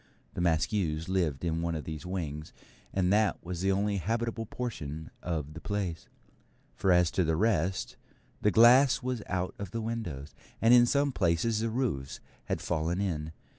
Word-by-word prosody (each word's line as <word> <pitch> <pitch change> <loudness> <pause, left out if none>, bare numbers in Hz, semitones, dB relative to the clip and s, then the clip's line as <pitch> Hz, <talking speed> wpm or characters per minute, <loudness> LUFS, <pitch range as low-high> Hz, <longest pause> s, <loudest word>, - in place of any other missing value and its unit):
The - - -3
Maskews 80 0 0
lived 85 -6 0
in 80 -1 -1
one 85 -1 -1
of 75 - -4
these 80 +2 -6
wings, 80 -5 -4 0.4
and 95 0 +1
that 105 -1 +3
was 90 -1 -4
the 95 +1 +2
only 100 +1 +1
habitable 115 +4 -2
portion 80 - -5
of 80 -4 -3
the 80 - -9
place; 100 -5 -3 0.6
for 95 - +1
as 90 -1 +4
to 95 - +1
the 80 -1 +1
rest, 95 -2 0 0.4
the 105 - +4
glass 120 +3 +6
was 125 -3 -2
out 90 0 -2
of 100 -2 -5
the 115 +4 -4
windows, 95 -12 -5 0.3
and 115 +2 +5
in 120 -1 +7
some 140 +2 +2
places 105 +2 +1
the 115 +1 0
roofs 110 - -2 0.3
had - - -2
fallen 85 +2 -1
in. 80 -6 -2
90 Hz, 170 wpm, -30 LUFS, 80-110 Hz, 0.6 s, in